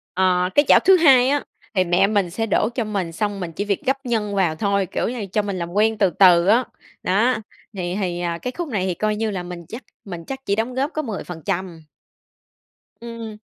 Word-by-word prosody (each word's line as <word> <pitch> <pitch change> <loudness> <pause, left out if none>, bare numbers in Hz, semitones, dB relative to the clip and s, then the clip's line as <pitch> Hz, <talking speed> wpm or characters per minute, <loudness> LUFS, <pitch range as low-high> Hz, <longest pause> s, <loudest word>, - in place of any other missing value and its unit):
Ờ, 180 -1 +2
cái 290 - +5
chảo - - +7
thứ 380 0 +5
2 265 -6 +6
á 290 0 +1 0.3
thì 185 - +4
mẹ 175 +2 +3
mình 200 -4 +1
sẽ 225 +6 -2
đổ 215 0 +1
cho 240 - 0
mình 200 -6 -3
xong 205 +3 -2
mình 175 -3 -5
chỉ 205 - -3
việc 200 -2 -1
gắp 265 +1 +2
nhân 215 -4 -1
vào 180 -5 +1
thôi, 200 +2 0
kiểu - - -2
như 245 0 -5
là, 210 - -3
cho 210 - +1
mình 200 -2 -4
làm 170 -1 -4
quen 220 +2 +2
từ 200 -3 +3
từ 175 0 +5
á, 230 +5 +5 0.4
đó, 220 +7 +2 0.4
thì 180 -2 -3
thì, 175 -2 -2
ờ, 170 -1 -2
cái 250 - -3
khúc 345 - -3
này 200 -7 -1
thì 185 - 0
coi 215 +4 -1
như 220 0 -2
là 185 -3 -4
mình 175 -1 -8
chắc 230 +7 -8 0.2
mình 175 -4 -7
chắc 270 -1 -5
chỉ 200 - +1
đóng 225 +4 -2
góp 275 +3 -1
có 310 - -1
10%. 180 - -5 1.2
Ừm. 230 -2 -7
200 Hz, 230 wpm, -21 LUFS, 180-230 Hz, 1.2 s, chảo